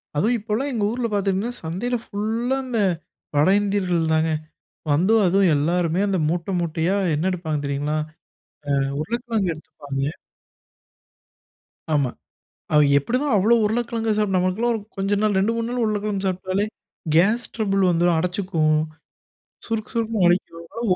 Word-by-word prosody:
அதுவும் 220 +11 +2
இப்போலாம் 225 +6 -2
எங்க 220 -4 -1
ஊர்ல 240 0 -1
பார்த்திங்கன்னா, 200 +3 0
சந்தையில 190 +10 -2
ஃபுல்லா 225 +6 -1
இந்த 245 -3 -1 0.6
வட 145 +3 +4
இந்தியர்கள் 180 -5 0
தாங்க. 160 0 +2 0.6
வந்து 180 +9 +3
அதுவும் 185 -1 +4
எல்லோருமே 170 +3 +1
அந்த 195 -1 +1
மூட்ட, 175 +3 -2
மூட்டையா 170 +3 0 0.2
என்ன 160 +5 0
எடுப்பாங்க 165 -4 -2
தெரியுங்களா? 145 +2 -1 0.9
அ - - -1 0.2
உருளைக்கிழங்கு 225 0 -1
எடுத்துப்பாங்கே 145 -3 -5 1.8
ஆமா 140 -4 +2 0.7
அது 150 - +6
எப்டிதான் 250 - 0
அவ்ளோ 210 +4 +4
உருளைக்கிழங்கு 225 0 0
சாப்பிட்டு, 210 -3 +1
நமக்கெல்லாம் 185 +7 +1
ஒரு 220 - -2 0.2
கொஞ்ச 195 +1 -1
நாள் 210 -2 +2
2, 210 +4 +2
3 230 0 -2
நாள் 245 0 -1
உருளைக்கிழங்கு 210 -2 -1
சாப்பிட்டாலே, 185 +2 -1 0.5
கேஸ் 215 +8 +4
ட்ரபிள் 195 -4 +1
வந்துரும், 175 0 +3
அடச்சுக்கும் 175 -3 +1 0.9
சுருக்கு 225 0 -3
சுருக்குன்னு 225 -4 +1
வலிக்கும். 170 -1 0
அவங்களா 230 -5 +1
195 Hz, 130 wpm, -23 LUFS, 170-225 Hz, 1.8 s, அது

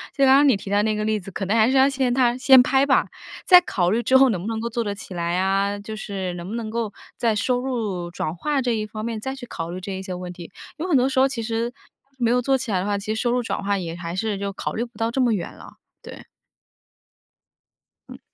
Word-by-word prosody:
就 275 - +4
刚 265 - +6
刚 285 +1 +5
你 240 - +3
提 195 - -9
到 205 0 +3
那 215 0 0
个 210 - -2
例 215 0 0
子， 195 - -10
可 195 +1 -4
能 200 +4 0
还 225 +1 +4
是 265 - +2
要 265 +1 +6
先 265 -2 0
他 245 -1 +2
先 260 0 +7
拍 270 +1 +3
吧， 270 -2 +3 0.4
再 360 -1 +8
考 180 - 0
虑 225 +3 +1
之 260 +3 +4
后 265 0 +6
能 190 -7 -1
不 195 - -6
能 225 -1 -2
够 230 - -3
做 235 0 -2
得 205 -2 -3
起 200 -2 -9
来 170 0 -1
啊， 195 +2 +1
就 205 +2 -7
是 195 -4 -4
能 175 0 -7
不 220 - -4
能 225 -2 -4
够 230 -2 -2 0.3
在 230 -2 +1
收 245 +4 0
入 220 -9 -3
转 165 -2 -4
化 285 - -1
这 245 - 0
一 215 -1 -3
方 215 0 -6
面 230 -2 -3
再 265 +4 -4
去 265 -2 -9
考 165 -8 -6
虑 180 +2 -5
这 185 +2 -7
一 190 - -5
些 190 -1 -6
问 180 0 -7
题。 175 0 -11 0.3
有 335 +4 -3
很 310 - +3
多 255 +1 +3
时 265 -1 0
候 265 - +5
其 260 -4 -4
实 230 +1 -2 0.5
没 235 -2 +1
有 250 +1 +3
做 270 +2 +2
起 250 -3 -4
来 190 - +1
的 185 - -2
话， 205 0 0
其 205 +2 -3
实 220 - -2
收 240 - +1
入 245 0 0
转 225 - -3
化 200 0 0
也 170 -3 -5
还 170 0 -6
是 205 0 -2
就 200 0 -3
考 - - -4
虑 230 - -2
不 240 0 -11
到 225 0 -1
这 265 - 0
么 240 -3 +3
远 195 - -4
了， - - -13 0.3
对。 - - -11 1.8
嗯。 - - -10
220 Hz, 300 characters per minute, -23 LUFS, 195-250 Hz, 1.8 s, 再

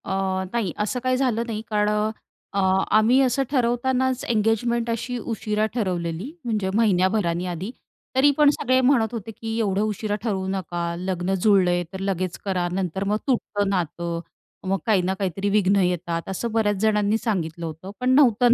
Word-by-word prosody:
अ, - - -2 0.4
नाही 225 -7 0
असं 210 +4 -1
काही 255 0 +2
झालं 245 -4 +1
नाही. 215 -2 -3
कारण 210 -1 +2
अ, 210 +1 +1 0.4
अ, 200 - 0 0.4
आम्ही 230 +5 +4
असं 265 +1 +2
ठरवतानाच 260 0 +1
एंगेजमेंट 230 +1 +1
अशी 235 +2 -2
उशिरा 215 -1 -1
ठरवलेली, 180 - -2
म्हणजे 210 -5 -1
महिन्याभराने 185 -4 +2
आधी. 180 +5 -4 0.4
तरीपण 285 +2 +5
सगळे 255 -3 +2
म्हणत 250 -4 +3
होते, 225 -1 -5
की 225 +1 -5
"एवढं 200 -3 +1
उशिरा 215 0 -1
ठरवू 195 -5 -1
नका. 180 -3 -3 0.2
लग्न 185 0 -2
जुळलंय, 180 -4 +4
तर 190 - -5
लगेच 185 -2 -2
करा, 185 -3 0
नंतर 190 0 -2
मग 210 +1 +2
तुटतं 205 -6 0
नातं. 170 -2 -2 0.5
मग 195 +1 +1
काही 210 -5 +3
ना 185 +2 0
काहीतरी 195 +1 -1
विघ्न 200 -1 +3
येतात." 175 -1 -1
असं 225 +5 -3
बऱ्याच 215 -2 +2
जणांनी 210 -1 +2
सांगितलं 170 -7 -2
होतं. 165 +4 -7
पण 250 0 0
न्हवतं, 245 -3 +5
210 Hz, 160 wpm, -24 LUFS, 185-235 Hz, 0.5 s, तरीपण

